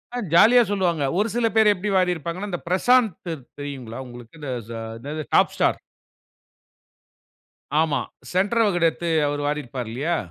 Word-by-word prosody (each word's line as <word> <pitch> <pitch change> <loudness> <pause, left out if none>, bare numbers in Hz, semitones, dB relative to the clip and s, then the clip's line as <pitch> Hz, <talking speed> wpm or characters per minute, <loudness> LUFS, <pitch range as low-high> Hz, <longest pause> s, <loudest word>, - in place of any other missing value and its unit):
அ - - -2 0.2
ஜாலியா 235 +8 +7
சொல்லுவாங்க. 175 -7 0 0.2
ஒரு 210 - +2
சில 235 -1 +2
பேரு 220 -1 +6
எப்டி 195 +3 -3
வாரீருப்பாங்கன்னா, 180 +1 -1
இந்த 175 - -4
பிரசாந்த் 225 +4 +3 0.5
தெரியுங்களா 130 -5 -6
உங்களுக்கு? 120 +3 -12
த 135 - -4 0.5
என்னது 150 +4 -5
டாப் - - +4
ஸ்டார் - - +2 2.0
ஆமா. 145 -4 +1 0.3
சென்டர் 205 +5 +2
வகுடு 175 -5 +2
எடுத்து 170 +2 -6 0.2
அவரு 145 0 -2
வாரிருப்பாரு 130 -5 -4
இல்லையா? 155 +7 -1
170 Hz, 135 wpm, -23 LUFS, 145-205 Hz, 2.0 s, ஜாலியா